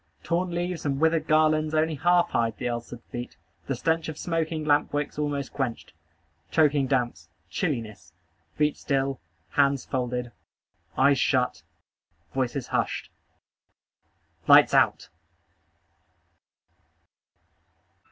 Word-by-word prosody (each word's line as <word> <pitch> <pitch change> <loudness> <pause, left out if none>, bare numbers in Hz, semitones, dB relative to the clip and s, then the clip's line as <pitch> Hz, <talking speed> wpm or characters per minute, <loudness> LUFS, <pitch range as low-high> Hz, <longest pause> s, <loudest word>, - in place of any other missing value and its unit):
Torn 175 +2 0
leaves 175 0 -3
and 140 -2 -1
withered 160 +1 +2
garlands 155 0 +3
only 160 +1 +2
half 175 +3 +2
hide 115 -2 0
the - - -3
ulcered 120 0 -5
feet. 120 0 -6 0.3
The 135 - -1
stench 160 +5 0
of 155 - -6
smoking 160 -2 -2
lamp 145 0 +2
wicks 145 0 -3
almost 145 -2 -2
quenched. 130 -4 -4 0.6
Choking 145 -4 +3
damps. 120 - -1 0.2
Chilliness. 110 - -3 0.4
Feet 150 -1 +1
still. 135 -2 -1 0.3
Hands 140 -1 +2
folded. 125 -1 -3 0.7
Eyes - - +4
shut. - - +1 0.7
Voices 130 0 -2
hushed. - - -2 1.4
LIGHTS - - +7
OUT! - - +3
145 Hz, 105 wpm, -26 LUFS, 125-160 Hz, 1.4 s, LIGHTS